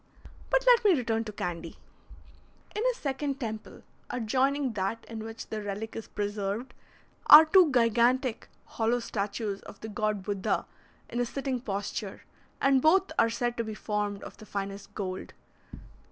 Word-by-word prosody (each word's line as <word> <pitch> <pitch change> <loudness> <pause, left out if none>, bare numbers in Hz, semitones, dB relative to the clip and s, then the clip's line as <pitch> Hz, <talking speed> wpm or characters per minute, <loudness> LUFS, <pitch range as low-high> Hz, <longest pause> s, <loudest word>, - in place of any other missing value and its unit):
But - - +2
let - - +6
me 400 -4 +6
return 230 -4 -1
to 215 - -5
Candy. 170 -4 -5 1.0
In 420 - -1
a - - -9
second 275 - -3
temple, 220 -4 -6 0.3
adjoining 260 +3 0
that 205 +3 -2
in 225 -1 -6
which 225 0 -7
the 215 -1 -5
relic 205 +2 -5
is 225 - -6
preserved, 205 +3 -3 0.5
are 310 +2 +11
two 340 -1 +6
gigantic 240 +1 +2 0.2
hollow 230 +2 0
statues 205 -2 -3
of 200 - -12
the 220 - -6
god 210 -1 -1
Buddha 200 -1 -1 0.4
in 240 - -4
a 245 - +2
sitting 270 0 -2
posture, 200 -3 -4 0.4
and 270 -1 +4
both 370 +6 +4
are 230 - +5
said 240 +1 -1
to 230 - 0
be 220 -1 -6
formed 210 -1 -2
of - - -10
the 215 - -12
finest 200 0 -5
gold. 185 -2 -5
225 Hz, 155 wpm, -29 LUFS, 205-260 Hz, 1.0 s, are